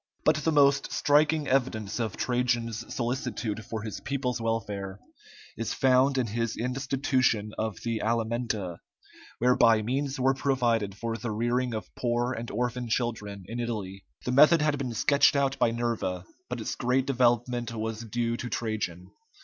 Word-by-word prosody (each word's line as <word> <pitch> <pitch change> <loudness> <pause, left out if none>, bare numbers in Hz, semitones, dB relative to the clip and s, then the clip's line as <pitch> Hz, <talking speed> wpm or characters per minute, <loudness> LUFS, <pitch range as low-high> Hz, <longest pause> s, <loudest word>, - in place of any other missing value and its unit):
But - - +4
the 160 - 0
most 140 -2 +4
striking 150 +1 +3
evidence 120 -6 0
of 110 -4 -2
Trajan's 120 -2 -1
solicitude 120 -3 -2
for 110 +1 -5
his 110 - -5
people's 125 -3 -2
welfare 100 -4 -3 0.6
is - - -3
found 135 +1 +4
in 130 - +2
his 115 +1 -2
institution 130 -3 0
of 110 -1 -2
the 115 -2 -1
alimenta, 115 -5 -1 0.6
whereby 115 -3 +4
means 135 +4 -2
were 130 +1 +3
provided 120 -7 0
for 115 0 -3
the 120 - -4
rearing 120 +2 0
of 110 - -6
poor 120 +1 0
and 120 -1 -5
orphan 125 +1 -2
children 110 -4 -2
in 115 +3 -5
Italy. 100 -5 -4 0.2
The 125 - 0
method 150 +4 +6
had 150 -2 +1
been 125 -4 -3
sketched 140 +6 +4
out 135 -1 +1
by - - +4
Nerva, 115 -6 -2 0.2
but 125 -1 -3
its 110 - -3
great 125 +2 +1
development 120 -2 +1
was 110 0 -4
due 115 +1 -1
to 120 - -5
Trajan. 100 -7 -3
120 Hz, 155 wpm, -28 LUFS, 110-130 Hz, 0.6 s, method